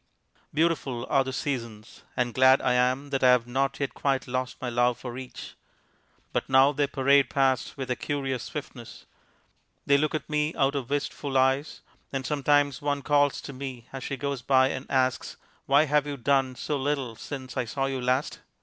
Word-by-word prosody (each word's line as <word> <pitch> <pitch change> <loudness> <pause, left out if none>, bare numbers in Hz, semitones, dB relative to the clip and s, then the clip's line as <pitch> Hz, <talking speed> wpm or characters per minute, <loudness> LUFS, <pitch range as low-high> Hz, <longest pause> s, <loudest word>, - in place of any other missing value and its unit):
Beautiful 145 -6 0
are 135 - +4
the 130 - -4
seasons; 120 -5 -5 0.2
and 120 -2 0
glad 130 +1 +6
I 125 - +1
am 130 +3 +1
that 135 -1 -1
I 130 - +7
have 125 -2 +4
not 135 +3 -1
yet 140 -1 -2
quite 135 -2 -1
lost 130 -1 -3
my 130 - -4
love 120 0 +1
for 120 -2 -7
each. 130 0 -8 0.8
But - - -1
now 135 +1 +6
they 145 0 0
parade 140 -1 +3
past 135 -1 +1
with 130 -2 -4
a - - +1
curious 135 -3 -3
swiftness! 130 -5 -8 0.8
They 140 0 +4
look 155 +1 0
at 155 -1 -4
me 150 +1 -1
out 135 -2 +2
of 135 -4 -4
wistful 145 -1 -2
eyes, 135 +3 +1 0.3
and 135 -1 -3
sometimes 145 -1 +2
one 145 -1 -1
calls 145 -1 +2
to 140 - -8
me 130 -2 -7
as 135 - -6
she 135 - -4
goes 140 -1 -3
by 130 +1 +4
and 130 +1 -5
asks, 130 -1 0 0.3
"Why 140 +3 +5
have 150 0 +1
you 145 -1 -4
done 135 0 +1
so 145 +3 -2
little 135 -4 -2
since 130 +1 -7
I 130 - -1
saw 135 +4 -2
you 135 -1 -2
last?" 130 +3 0
135 Hz, 190 wpm, -27 LUFS, 130-140 Hz, 0.8 s, I